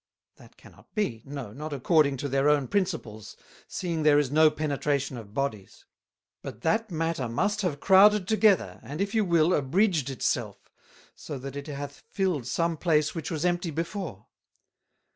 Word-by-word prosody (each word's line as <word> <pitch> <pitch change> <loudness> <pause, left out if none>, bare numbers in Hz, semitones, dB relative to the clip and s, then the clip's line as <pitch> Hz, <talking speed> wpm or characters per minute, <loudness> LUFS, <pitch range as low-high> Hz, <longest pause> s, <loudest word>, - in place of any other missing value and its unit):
That - - -18
cannot - - -19
be, 135 - -1
no 135 -7 -7
not 150 +4 -6
according 140 0 +2
to 140 - -3
their 135 +1 +2
own 145 -3 +2
Principles, 155 - -3 0.3
seeing 170 -3 -3
there 150 -1 +5
is 145 -3 +1
no 155 +1 +6
Penetration 145 -3 -2
of 110 -3 -10
Bodies: 110 -9 -4 0.6
But - - -8
that 220 0 0
matter 165 -7 -2
must 205 - 0
have 165 -7 -2
crowded 195 +1 +5
together, 205 - +2
and 140 +8 -8
if 200 +2 -1
you 220 -1 +3
will, 170 -2 +3
abridged 155 - +1
it 135 - -6
self, - - -2 0.4
so 145 - -7
that 135 +1 -8
it 140 +1 -6
hath 145 -1 -7
filled 180 - -1
some 165 +6 0
place 155 -2 +1
which 165 - -5
was 160 0 -2
empty 175 0 0
before. 165 - -5
155 Hz, 165 wpm, -27 LUFS, 135-180 Hz, 0.6 s, no